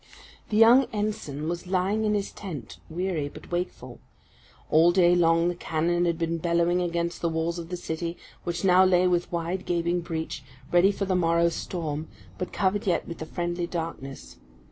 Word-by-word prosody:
The 210 - 0
young 235 +4 +7
ensign 205 -9 -3
was 175 +2 -4
lying 195 +4 +1
in 210 0 +2
his 200 -1 -2
tent, 160 - -8
weary, 165 -3 -2
but - - -13
wakeful. 175 +1 -4 0.7
All 165 +3 +6
day 175 -1 +5
long 165 -1 +4
the 175 - +1
cannon 175 +1 0
had 170 -1 0
been 165 0 -1
bellowing 170 +1 +2
against 170 -1 -2
the 170 - +1
walls 165 +1 -1
of 165 -1 -8
the 180 - -3
city, 170 0 -4 0.3
which 175 +2 -2
now 185 0 +6
lay 185 -1 +4
with 175 -1 +1
wide, 175 +2 -2
gaping 175 0 0
breach, 160 -3 -4 0.3
ready 175 +3 +5
for 200 0 -3
the 190 -1 0
morrow's 170 -1 +3
storm, 160 -3 -4 0.3
but 180 - -3
covered 200 +1 0
yet 180 - +1
with 170 - -7
the 160 - -6
friendly 175 0 -2
darkness. 135 - -6
175 Hz, 180 wpm, -26 LUFS, 165-180 Hz, 0.7 s, young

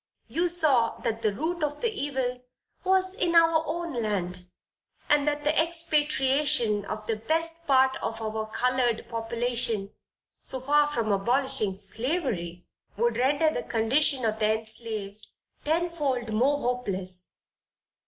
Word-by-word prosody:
You 345 +2 0
saw 295 -9 +3
that 230 -2 -2
the 215 -2 +1
root 320 - -3
of 295 0 -2
the 470 - +1
evil 260 -6 -3 0.4
was 375 0 +2
in 345 -3 -1
our 330 -1 +5
own 340 0 -3
land, 180 -4 -3 0.6
and 295 0 +3
that 295 0 -1
the 300 +1 +2
expatriation 295 -8 +1
of 215 +1 -6
the 225 -1 -1
best 330 +7 -1
part 265 -1 +4
of 225 - -4
our 220 0 -3
colored 250 -1 0
population, 230 -2 -1 0.5
so 260 - -3
far 295 +3 +3
from 230 -7 -1
abolishing 235 0 +2
slavery, 205 - -3 0.3
would 235 +1 +1
render 285 +5 +2
the - - -2
condition 245 +4 +2
of 220 0 -1
the 215 0 +2
enslaved 220 -2 -7 0.4
tenfold 295 -8 -1
more 265 +6 +2
hopeless. 195 -9 -3
250 Hz, 135 wpm, -27 LUFS, 220-300 Hz, 0.6 s, our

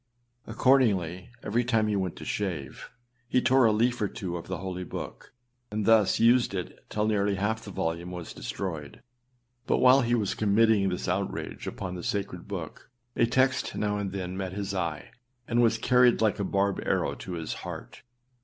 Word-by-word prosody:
Accordingly, 105 -8 +2
every 115 +4 +1
time 115 -3 +2
he 105 - 0
went 95 -3 -1
to - - -9
shave, 85 -10 -4 0.4
he 125 - +3
tore 130 0 +4
a 110 - +5
leaf 120 +3 +1
or 105 - +2
two 90 -3 -5
of 85 - -6
the 95 - -3
holy 95 -1 -5
book, - - -7 0.4
and 105 0 -2
thus 110 -3 +4
used 120 -2 +4
it 90 - -6
till 105 0 0
nearly 100 -2 +1
half 110 +3 -1
the 105 - -8
volume 85 -1 -3
was 90 -2 -7
destroyed. 75 - -6 0.6
But - - +3
while 130 +2 +6
he 120 -1 +2
was 105 -5 0
committing 105 -1 +3
this 90 0 -3
outrage 95 +2 -3
upon 90 -2 -5
the 90 - -5
sacred 100 -3 -3
book, 90 -6 -7 0.3
a 115 - +3
text 130 +2 +1
now 105 -1 -1
and 100 -2 -3
then 95 -1 -4
met 95 -1 -4
his 100 0 -3
eye, 85 -5 -3 0.4
and 120 +1 +2
was 115 -1 +3
carried 125 +1 +4
like 110 -3 +2
a - - 0
barbed 100 0 0
arrow - - 0
to 95 - -7
his 80 -2 -4
heart. - - -8
100 Hz, 185 wpm, -28 LUFS, 90-115 Hz, 0.6 s, while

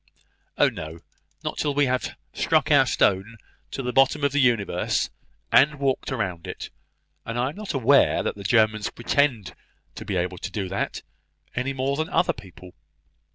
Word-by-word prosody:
"Oh, - - +5
no; 80 +2 -6 0.4
not - - -4
till 145 -2 0
we 145 0 +4
have 130 0 -2 0.2
struck - - +1
our - - +6
stone 100 +5 +1 0.3
to 135 - -5
the 125 0 -2
bottom 135 +3 +3
of 140 - +3
the 145 0 +2
universe, 115 -7 +1 0.4
and 145 +2 +5
walked 135 -2 -1
round 95 -10 -3
it: - - -7 0.5
and 115 +1 -5
I 125 +2 +1
am - - -15
not 210 -6 -5
aware 130 -4 +4
that - - -1
the 100 - -10
Germans 110 0 +2
pretend 120 - 0 0.4
to - - -8
be 100 - -3
able 90 0 -2
to - - -5
do 100 -4 -3
that, 95 - -3 0.5
any 125 +2 -1
more 135 +1 -1
than 160 +2 -2
other 180 - +2
people. 90 -3 -13
120 Hz, 175 wpm, -24 LUFS, 100-140 Hz, 0.5 s, our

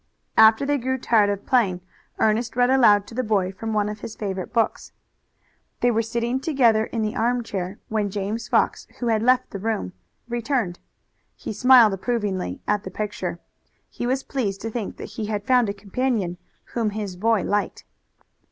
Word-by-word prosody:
After 220 +4 +6
they 290 0 +1
grew 260 +2 -1
tired 220 -4 +3
of 200 -1 -3
playing 210 -9 +2 0.4
Ernest 220 +1 +1
read 245 +1 +3
aloud 210 -6 +5
to - - -12
the 255 +2 -1
boy 200 -5 +1
from 225 +4 -5
one 210 -1 +1
of 210 0 -5
his 220 - -7
favorite 190 -3 -4
books. 230 -2 -1 0.9
They 245 - +4
were 225 0 +2
sitting 235 +3 -1
together 245 -8 +3
in 225 -1 -3
the 215 +1 -2
armchair 220 -5 -1
when 215 -2 -1
James 210 +3 -3
Fox, - - +1
who 240 - -2
had 220 -1 +2
left 250 +2 +2
the 200 - -5
room, 210 - -2 0.3
returned. 235 -6 -1 0.6
He - - -6
smiled 245 -1 +6
approvingly 195 - -2
at 210 -1 +1
the - - -6
picture. 210 +1 -4 0.5
He 240 - -4
was 260 +2 0
pleased 205 -8 -2
to 225 - -4
think 220 -3 -4
that - - -7 0.2
he 210 - -2
had 210 -1 -3
found 250 -4 +3
a - - +1
companion 200 -3 -2 0.3
whom 230 -3 0
his 200 -4 -4
boy 220 +1 +1
liked. 205 0 -2
220 Hz, 180 wpm, -23 LUFS, 205-240 Hz, 0.9 s, After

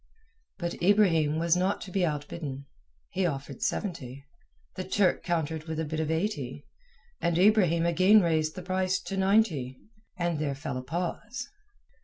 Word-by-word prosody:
But 170 -2 -4
Ibrahim 170 -6 +4
was 170 +1 +3
not 185 +2 +1
to 195 - -8
be 190 0 +1
outbidden. 145 -3 -3 0.5
He 185 -1 +1
offered 140 -3 -5
seventy, 140 - -3 0.5
the 185 - -3
Turk 190 0 +2
countered 160 -2 -2
with 160 -1 -4
a 160 - -1
bid 155 +1 -3
of 155 -1 -1
eighty, 160 - -2 0.6
and 170 -1 +1
Ibrahim 180 -4 +4
again 185 +5 +6
raised 160 -3 +1
the 185 - -6
price 185 +1 0
to 195 - -5
ninety, 190 - +2 0.4
and 170 -3 -1
there 145 -2 -1
fell 135 -2 -4
a - - -3
pause. 175 - -4
170 Hz, 155 wpm, -28 LUFS, 150-185 Hz, 0.6 s, again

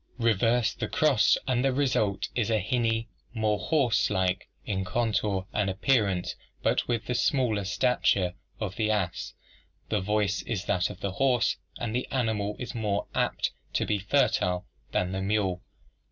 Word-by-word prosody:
Reverse 115 +1 +2
the - - -3
cross 140 -9 +4
and 125 -1 +1
the 135 - +3
result 125 -7 +1
is 120 -3 0
a 110 - +3
hinny, 115 +2 0 0.3
more 110 -2 +1
horselike 105 - +1 0.2
in 95 -2 -1
contour 105 -1 0
and 105 -2 +1
appearance, 100 -3 +1 0.3
but - - +1
with 120 -2 -1
the 125 - -1
smaller 120 -4 +1
stature 100 -4 +2 0.3
of 100 -3 -4
the 110 -1 +1
ass. 100 -5 -1 0.5
The - - +1
voice 105 -1 +1
is 100 +1 -3
that 90 -4 +1
of 100 - -10
the 100 - -1
horse, 125 +3 +2 0.2
and 115 -2 -3
the 125 - -1
animal 110 -5 -1
is 125 - -5
more 105 -3 -1
apt - - 0 0.2
to - - +1
be 105 - 0
fertile 90 -2 +1 0.3
than 90 0 0
the 95 0 -2
mule. 95 -3 0
105 Hz, 155 wpm, -28 LUFS, 95-120 Hz, 0.5 s, cross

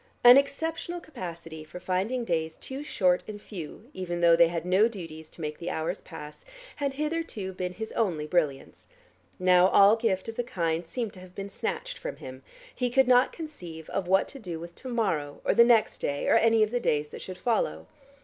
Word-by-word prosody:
An 245 +1 +11
exceptional 325 +5 0
capacity 170 - -8
for 155 +3 -10
finding 195 +8 -1
days 160 -4 -1
too 270 +2 -7
short 180 -10 +2
and 210 -1 -7
few, 205 - -9
even 175 -2 -4
though 170 -1 +6
they 170 0 +6
had 170 0 -3
no 190 +5 +4
duties 165 -8 -8
to - - -11
make 150 -1 -4
the 175 - -4
hours 160 0 -2
pass, 150 0 -10 0.3
had 280 -2 -1
hitherto 300 - -3
been 180 0 -4
his 220 +3 -6
only 175 -9 0
brilliance; 150 -5 -1 0.5
now 180 -1 +5
all 200 +2 +6
gift 215 -5 -1
of 225 - -6
the 245 - 0
kind 170 -6 -2
seemed 230 +1 -3
to 185 - -12
have 185 0 -14
been 200 0 -5
snatched - - -4
from - - -5
him: 130 0 -10 0.3
he 250 -1 -1
could 265 +1 +4
not 250 0 +5
conceive 175 - -9
what 190 +2 +3
to 275 - -9
do 175 -8 -6
with 170 +1 -9
to 260 - -9
morrow 170 -12 -1
or - - +3
the 235 - +7
next 235 -2 +3
day 145 0 -2
or - - +4
any 225 -1 +5
of 215 - -1
the 245 - 0
days 150 -9 0
that - - -9
should 185 -1 -7
follow. 245 - 0
190 Hz, 205 wpm, -28 LUFS, 170-240 Hz, 0.5 s, An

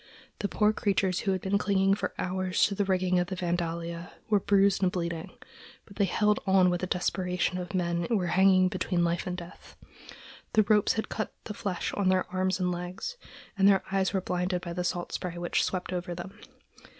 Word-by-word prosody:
The 205 - 0
poor 210 +1 +2
creatures 195 -3 +1
who 195 - 0
had 190 -1 -1
been 200 +1 +1
clinging 195 -1 +2
for 200 - -3
hours 185 0 +1
to 205 - -1
the 200 0 0
rigging 185 -1 +2
of 175 - 0
the 190 - -4
Vandalia 170 -1 -3 0.2
were 205 - +5
bruised 200 0 +3
and 185 -1 +3
bleeding; 170 -2 -3 0.6
but 200 - -15
they 200 - +3
held 210 +3 +2
on 190 -1 +5
with 175 - -1
the 185 - -1
desperation 180 0 -1
of 180 +1 -5
men 170 -1 0
who 230 - +3
were 185 - -1
hanging 185 0 +5
between 180 -1 0
life 170 +2 0
and 180 0 -3
death. 175 -1 -11 0.8
The 215 - +5
ropes 210 0 +3
had 220 - -3
cut 215 - -4
the 215 - -6
flesh 195 -3 -3
on 200 -2 +1
their 185 0 +2
arms 185 0 0
and 180 -1 +1
legs, 180 - -5 0.4
and 195 -1 +4
their 195 -2 +5
eyes 195 -1 +1
were 190 - 0
blinded 180 0 -1
by 170 -2 -5
the 180 +1 -2
salt 175 0 -2
spray 175 -1 -4
which 175 0 0
swept 185 -1 -2
over 175 -1 -3
them. 190 +4 -9
185 Hz, 210 wpm, -28 LUFS, 180-195 Hz, 0.8 s, were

